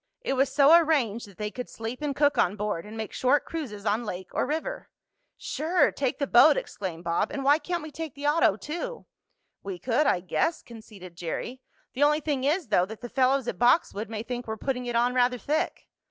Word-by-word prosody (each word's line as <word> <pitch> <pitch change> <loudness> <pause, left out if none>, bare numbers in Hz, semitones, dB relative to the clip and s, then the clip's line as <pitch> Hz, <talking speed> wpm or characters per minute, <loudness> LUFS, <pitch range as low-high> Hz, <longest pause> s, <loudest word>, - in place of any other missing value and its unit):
It - - -1
was 270 0 +2
so 285 +3 +6
arranged 275 -10 +2
that 195 -3 -17
they 210 0 -3
could 250 +1 -6
sleep 230 +4 -6
and 290 -2 -2
cook 290 0 +3
on 180 - +2
board, 210 -3 -3
and 220 +1 -9
make 220 -2 -5
short 260 +3 +2
cruises 230 -11 -6
on 215 +3 +1
lake 185 -3 -6
or - - 0
river. 320 - -4 0.5
"Sure, 340 +4 +1
take 265 -3 -2
the 280 - 0
boat!" 280 +4 +6
exclaimed 175 -4 -5
Bob. 170 0 0
"And 275 - -4
why 290 +3 +5
can't 345 +1 -3
we 310 - -8
take 315 -1 -6
the 285 +1 -7
auto 295 -8 +3
too?" 345 - -6 0.6
"We 195 -2 -6
could, 250 - +1
I - - +3
guess," 310 - -1
conceded 210 -6 -12
Jerry. 180 +9 -5 0.3
"The 260 - -5
only 300 +1 +4
thing 285 -4 -2
is, 305 - 0
though, 180 -3 +3
that 220 +1 -9
the 240 - -7
fellows 265 0 +2
at 180 - -4
Boxwood 240 -4 +2
may 220 -1 -4
think 245 0 -5
we're 220 0 -4
putting 250 +1 -3
it 240 - -3
on 240 +1 +2
rather 250 0 +2
thick." 305 +6 -2
250 Hz, 215 wpm, -27 LUFS, 215-295 Hz, 0.6 s, so